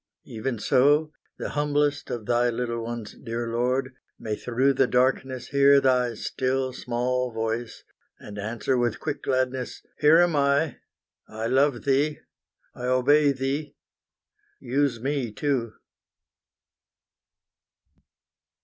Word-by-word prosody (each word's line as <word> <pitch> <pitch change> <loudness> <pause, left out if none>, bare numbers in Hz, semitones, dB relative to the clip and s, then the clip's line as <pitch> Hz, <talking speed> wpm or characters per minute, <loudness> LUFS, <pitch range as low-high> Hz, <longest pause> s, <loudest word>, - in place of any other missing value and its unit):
Even 120 +2 -4
so, 145 +7 +3 0.2
the - - -4
humblest 145 0 0
of 115 -3 -4
thy 120 +2 +2
little 115 -1 -3
ones, 115 -2 -6
dear 115 0 -5
Lord, 130 +3 0 0.2
May 110 -1 -3
through 125 +5 +1
the - - +2
darkness 130 0 0
hear 140 0 +5
Thy 125 -3 +2
still 130 +2 -2
small 125 +1 -1
voice, 115 +1 -4 0.3
And 105 0 -9
answer 115 +5 -1
with 120 -2 0
quick 150 -2 -4
gladness 130 -1 -2 0.2
"Here 150 +2 +6
am 175 -2 +4
I, 140 0 +2 0.5
I 110 +1 -5
love 130 +1 +2
Thee, 145 +2 +1 0.6
I 125 - -7
obey 140 +3 +4
Thee, 140 +2 -3 0.8
use 130 -1 0
me 135 -2 -2
too!" 120 -1 -1
130 Hz, 115 wpm, -25 LUFS, 120-140 Hz, 0.8 s, Here